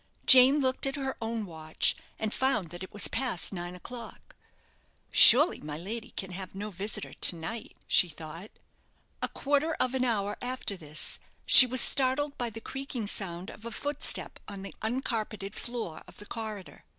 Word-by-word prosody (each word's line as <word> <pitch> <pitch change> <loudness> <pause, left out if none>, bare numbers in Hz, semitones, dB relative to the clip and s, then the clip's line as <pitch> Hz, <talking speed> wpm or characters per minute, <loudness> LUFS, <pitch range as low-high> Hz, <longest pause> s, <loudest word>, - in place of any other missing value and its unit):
Jane 260 +2 +6
looked 260 0 -1
at 270 - -3
her 270 -2 -4
own 225 -1 -4
watch, 160 -3 -2 0.2
and 220 -1 -4
found 225 -11 -1
that 175 +1 -10
it 190 - -9
was 205 - +2
past 235 -8 -1
nine 175 -1 -7
o'clock. 230 +5 -11 0.8
"Surely 295 +9 +7
my 150 0 -7
lady 220 +8 -7
can 190 -1 -5
have 185 0 -9
no 210 +2 -6
visitor 205 +3 -4
to - - +1
night?" 210 +8 -8
she 180 - +4
thought. 160 +5 -11 0.7
A - - -1
quarter 290 +3 -1
of 255 - -1
an 260 -1 -1
hour 210 -4 -2
after 250 -5 -3
this, 155 -4 -3 0.3
she 255 - +11
was 255 0 +3
startled 280 +2 +3
by 240 -1 -4
the 225 0 -10
creaking 270 -3 -6
sound 190 0 -3
of 215 - -15
a 235 - -6
footstep 290 +5 -2
on 200 -2 -9
the 195 - -9
uncarpeted 220 -4 -4
floor 230 -11 -7
of - - -16
the 205 - -13
corridor. 215 -4 -9
220 Hz, 175 wpm, -28 LUFS, 190-255 Hz, 0.8 s, she